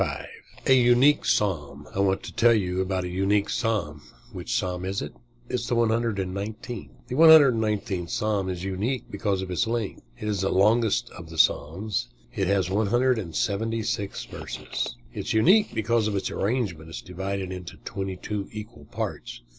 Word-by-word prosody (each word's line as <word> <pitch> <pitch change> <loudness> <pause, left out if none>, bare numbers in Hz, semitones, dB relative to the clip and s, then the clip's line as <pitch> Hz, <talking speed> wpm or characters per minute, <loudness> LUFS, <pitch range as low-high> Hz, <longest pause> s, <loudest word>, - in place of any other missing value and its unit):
"_ - - -2 0.4
A 135 - +6
UNIQUE 125 +3 +5
PSALM 75 -8 0
I - - -3
want 95 -1 +2
to - - -8
tell 115 0 +5
you 95 -3 0
about 95 0 -1
a - - -3
unique 100 +3 +1
Psalm. 95 - -1 0.3
Which - - -2
Psalm 90 -1 -2
is 95 +1 -2
it? 75 - -6 0.3
It - - -9
is 120 -1 -1
the 120 - 0
119th. 110 -1 -1 0.2
The 125 - -5
119th 115 - +5
Psalm 105 -3 0
is 90 -1 -4
unique 105 +7 -2
because 100 -4 -1
of 95 - -6
its 100 +6 +1
length. 115 -3 -2 0.2
It 105 - -5
is 100 -3 0
the 95 - +1
longest 110 +3 +3
of 85 -2 -10
the 80 - -9
Psalms. 100 - +1 0.3
It 95 -3 0
has 95 -2 +2
one 100 +3 +1
hundred 125 +2 +3
and 85 -6 -6
seventy 115 +1 0
six 100 -1 -3
verses. - - -5 0.2
It - - -6
is - - -2
unique 190 - +5
because 110 0 +1
of 105 - -1
its 95 - -2
arrangement. 95 -8 -2
It 80 - -8
is - - -5
divided 95 +1 -4
into 90 -2 -7
twenty 95 -1 -4
two 100 +1 -4
equal 105 -7 -9
parts. - - -5
100 Hz, 185 wpm, -26 LUFS, 95-115 Hz, 0.4 s, A